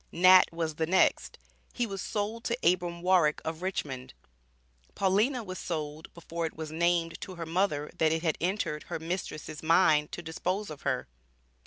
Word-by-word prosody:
Nat 185 +2 +7
was 165 -1 -2
the 160 +1 -1
next; 185 +2 +2 0.4
he 245 - 0
was 195 -4 -5
sold 215 +3 -3
to 235 - 0
Abram 175 -1 +1
Warrick, 180 -5 +4
of 160 +1 -4
Richmond. 135 -9 -4 0.8
Paulina 215 +7 +2
was 185 -2 -6
sold 155 -2 -5
before 170 0 -3
it - - -10
was 155 -1 -6
named 170 0 +1
to 185 - -7
her 170 -1 -5
mother 160 -3 0
that 160 -1 +4
it 160 +1 -1
had 160 -3 +1
entered 175 -4 -1
her - - -4
mistress's 160 -2 -5
mind 155 -2 +4
to 175 - -5
dispose 180 +4 -3
of 150 - -9
her. 130 -3 -1
170 Hz, 170 wpm, -29 LUFS, 155-185 Hz, 0.8 s, Nat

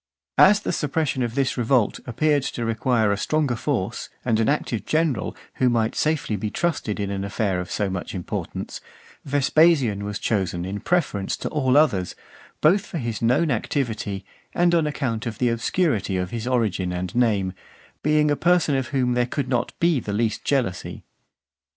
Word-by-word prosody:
As 205 +1 +7
the - - -2
suppression 150 -2 -1
of 120 -1 -2
this 135 -1 0
revolt 120 -2 +2
appeared 145 +4 +2
to 120 -3 -3
require 115 -1 +1
a 100 - 0
stronger 150 0 0
force - - -2 0.2
and 115 -3 +2
an 110 - +2
active 135 -6 -1
general, 155 -7 0 0.2
who 130 - +3
might 115 -2 +1
be - - -11
safely 150 -9 0
trusted 145 -7 -2
in 100 -1 -2
an 100 -1 -3
affair 100 -2 -1
of 90 - -5
so 105 - -1
much 95 0 -4
importance, 90 - -5 0.4
Vespasian 145 -6 +3
was 105 0 -3
chosen 90 -5 -1
in 100 +2 -4
preference 130 - 0
to - - -4
all 135 -3 +2
others, 100 - +2 0.5
both 190 +6 +4
for 175 - -6
his 115 -6 -3
known 125 +7 +2
activity, 110 -10 -2 0.3
and 175 0 +3
on 165 -3 +3
account 125 -6 -2
of 110 -3 -4
the 125 - +2
obscurity 115 - 0
of 90 -1 -2
his 115 0 -4
origin 105 -8 0
and 90 0 -4
name, 105 -6 +1 0.5
being 150 0 +3
a - - +3
person 170 -3 +2
of 130 -2 -1
whom 130 -4 0
(446) - - -2
there 125 0 0
could 140 -3 -2 0.3
be 170 -2 +3
not - - -11
the 100 - -3
least 110 +1 -1
jealousy. 120 -11 -1
120 Hz, 180 wpm, -23 LUFS, 105-150 Hz, 0.5 s, As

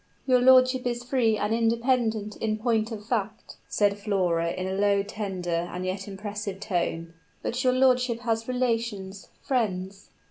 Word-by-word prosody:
"Your 255 -2 +4
lordship 255 0 +5
is 240 0 -2
free 245 -4 +1
and 210 +1 0
independent 230 -2 +1
in 215 -1 -1
point 225 0 0
of 210 -2 -7
fact," 220 -2 -3
said 205 -1 +1
Flora, 180 -5 0
in 185 +2 -3
a 190 - -2
low, 200 0 +2
tender 180 -5 -3
and 180 +1 -4
yet 190 +1 -3
impressive 200 0 -5
tone; 170 -4 -2 0.3
"but 250 +2 -2
your 255 -1 +3
lordship 250 -2 +2
has 225 -1 -1
relations 230 -6 -2
friends." 195 -6 -2
215 Hz, 150 wpm, -26 LUFS, 195-240 Hz, 0.3 s, lordship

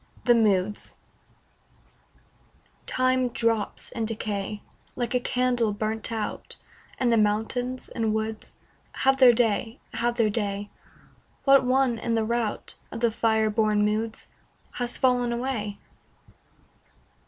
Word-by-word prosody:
THE 240 - +6
MOODS 210 -3 +1 1.9
Time 255 0 +1
drops 230 -2 -1
in 225 - -2
decay, 210 -2 -4 0.3
Like 240 0 -2
a 250 - +3
candle 245 -3 0
burnt 215 +2 -3
out, 220 -2 -4 0.4
And 245 -2 +1
the 230 - +4
mountains 225 +5 -1
and 225 -2 -1
woods 220 0 -4 0.4
Have 270 0 +2
their 255 -2 +8
day, 225 0 0
have 240 0 0
their 225 -3 +2
day; 205 -1 -3 0.7
What 275 -1 +6
one 255 -2 +2
in 230 +1 -1
the 225 -1 +1
rout 235 -1 -2 0.2
Of 230 - -6
the 235 -1 +3
fire 220 -1 +1
born 210 -1 +2
moods, 220 +1 -2 0.5
Has 245 -1 -1
fallen 245 -2 +2
away? 235 -4 -3
230 Hz, 120 wpm, -26 LUFS, 215-245 Hz, 1.9 s, their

